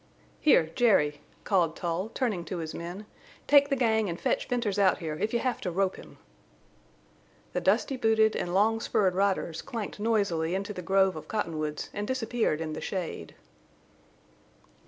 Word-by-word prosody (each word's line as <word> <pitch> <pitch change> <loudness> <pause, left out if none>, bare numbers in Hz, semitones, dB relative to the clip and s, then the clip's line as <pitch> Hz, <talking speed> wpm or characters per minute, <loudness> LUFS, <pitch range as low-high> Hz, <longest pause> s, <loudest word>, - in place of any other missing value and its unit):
"Here, 165 - +4
Jerry," 155 -10 +3 0.2
called 175 -5 +1
Tull, 175 +4 -2
turning 215 -10 -1
to 185 - -4
his 160 -2 -5
men, 175 +5 -7 0.4
"take 285 -1 +5
the 275 - +2
gang 220 -5 +2
and 170 - -4
fetch - - 0
Venters 230 -5 -1
out 190 -2 +4
here 160 -3 -4
if 215 - -1
you 235 - +1
have 250 0 -2
to 185 - -2
rope 190 +2 0
him." - - -13 1.4
The - - -1
dusty 270 - +1
booted 220 -2 +3
and 175 - -2
long 215 +4 +3
spurred 195 -4 +1
riders 185 -4 0
clanked 230 -6 -6
noisily 200 -7 +1
into 200 +2 -3
the 180 - -6
grove 190 +1 +2
of 155 - -8
cottonwoods 155 -8 -3
and 205 0 -3
disappeared 235 -9 -1
in 155 -1 -3
the - - -5
shade. 170 - -5
195 Hz, 165 wpm, -28 LUFS, 170-225 Hz, 1.4 s, take